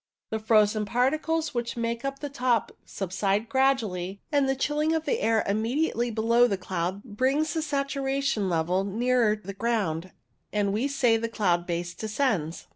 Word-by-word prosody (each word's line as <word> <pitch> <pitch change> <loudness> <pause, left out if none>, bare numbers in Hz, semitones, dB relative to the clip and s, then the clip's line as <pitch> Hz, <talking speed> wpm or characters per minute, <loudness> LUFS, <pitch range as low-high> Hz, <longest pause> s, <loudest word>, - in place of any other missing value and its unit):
The 220 - -1
frozen 215 -1 +3
particles 310 +7 0
which 240 +1 -3
make 235 0 -2
up 275 0 -3
the 290 - -5
top 250 -5 0 0.2
subside 195 +3 -1
gradually, 220 -8 0
and 285 -2 +2
the 270 - +2
chilling 300 +4 0
of 320 0 -2
the 470 +4 0
air 225 -1 +2
immediately 235 +4 0
below 230 +2 +3
the 200 -4 -1
cloud 185 +1 -3
brings 265 +7 0
the 320 - -1
saturation 275 -6 -1
level 175 +3 +1
nearer 230 +2 +2
the 200 -2 -8
ground, 195 -6 -1 0.4
and 205 -1 0
we 230 +7 0
say 250 -5 +3
the 230 +1 -3
cloud 175 -6 0
base 175 0 -3
descends. 215 - -1
230 Hz, 160 wpm, -27 LUFS, 200-270 Hz, 0.4 s, frozen